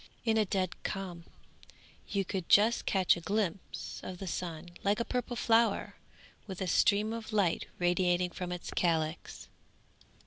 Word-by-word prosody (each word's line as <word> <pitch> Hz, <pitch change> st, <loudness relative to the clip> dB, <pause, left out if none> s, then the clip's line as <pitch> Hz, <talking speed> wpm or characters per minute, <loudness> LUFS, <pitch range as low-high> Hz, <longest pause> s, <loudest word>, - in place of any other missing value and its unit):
In 225 Hz, -1 st, +3 dB
a 220 Hz, -1 st, +3 dB
dead 185 Hz, -2 st, -2 dB
calm 180 Hz, -4 st, -5 dB, 0.8 s
you 195 Hz, -1 st, -1 dB
could 185 Hz, -2 st, -4 dB
just 220 Hz, +3 st, +5 dB
catch 190 Hz, -2 st, +4 dB
a 175 Hz, -, -7 dB
glimpse 195 Hz, -1 st, -3 dB
of 185 Hz, -, -7 dB
the 195 Hz, -, -6 dB
sun 175 Hz, -2 st, -4 dB
like 205 Hz, +2 st, +2 dB
a 235 Hz, -, 0 dB
purple 250 Hz, -1 st, -2 dB
flower 230 Hz, -2 st, +2 dB, 0.5 s
with 190 Hz, -3 st, -6 dB
a 190 Hz, -, -1 dB
stream 205 Hz, +4 st, +3 dB
of 230 Hz, -1 st, -6 dB
light 200 Hz, -6 st, +1 dB
radiating 175 Hz, 0 st, +2 dB
from 180 Hz, 0 st, -5 dB
its 180 Hz, -1 st, -5 dB
calyx. 160 Hz, -2 st, -1 dB
190 Hz, 150 wpm, -31 LUFS, 175-210 Hz, 0.8 s, just